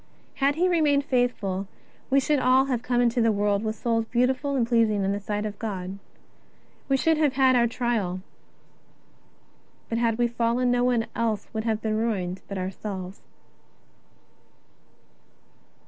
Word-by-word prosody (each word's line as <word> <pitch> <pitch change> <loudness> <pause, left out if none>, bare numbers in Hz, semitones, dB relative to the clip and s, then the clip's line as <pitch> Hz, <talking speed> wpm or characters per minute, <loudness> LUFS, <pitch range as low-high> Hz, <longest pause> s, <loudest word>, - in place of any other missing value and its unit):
Had 280 +1 +2
he 355 +3 +2
remained 300 -5 +2
faithful, 215 -7 -1 0.4
we 275 +1 +4
should 290 +1 +1
all 260 +1 +4
have 255 -4 -1
come 245 0 +1
into 240 0 +2
the 225 0 +3
world 205 0 0
with 220 0 -2
souls 225 0 0
beautiful 260 +4 0
and 245 -3 +2
pleasing 225 -4 +2
in 195 - 0
the 200 - -2
sight 210 +1 -3
of 210 -1 -6
God. 195 -3 -5 0.9
We 270 - +3
should 320 +3 +2
have 295 -4 +2
had 260 -1 +4
our 235 -1 +4
trial, 225 -7 -2 1.7
but 230 - -1
had 230 -2 +1
we 240 0 +2
fallen 235 +1 0
no 245 0 +2
one 245 -2 +2 0.5
would 220 -1 -2
have 220 -1 -1
been 215 -1 0
ruined 190 -5 -2
but 200 - -5
ourselves. 190 0 -5
230 Hz, 150 wpm, -25 LUFS, 205-255 Hz, 1.7 s, we